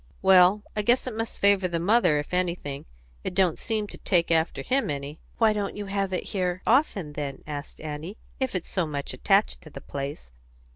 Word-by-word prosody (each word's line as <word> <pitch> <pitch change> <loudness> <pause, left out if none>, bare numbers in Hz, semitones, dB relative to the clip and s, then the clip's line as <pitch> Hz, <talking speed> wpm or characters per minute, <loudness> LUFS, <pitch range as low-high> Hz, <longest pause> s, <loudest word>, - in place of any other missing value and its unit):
"Well, 190 +2 +6
I 210 - +1
guess 240 +5 +3
it 250 -4 -4
must 225 0 -4
favour 200 -2 +4
the 170 -1 -2
mother, 195 -3 +4
if 145 +4 -4
anything. 170 -6 -2 0.4
It 180 - -4
don't 185 -4 +2
seem 220 -2 -1
to - - -10
take 170 -3 +1
after 160 0 +1
him 265 -4 +1
any." 145 +1 -4 0.2
"Why 220 -2 +4
don't 205 -1 -3
you 205 - -4
have 195 -1 -1
it 185 - -3
here 185 -2 -1
often, 210 - +2
then," 140 -2 -5
asked 145 -1 -7
Annie, 155 +6 -6 0.2
"if 260 -6 -1
it's 180 - -3
so 180 -4 -1
much 145 -2 -3
attached - - +2
to - - -12
the - - -9
place?" 140 - -6
180 Hz, 200 wpm, -26 LUFS, 150-205 Hz, 0.4 s, Well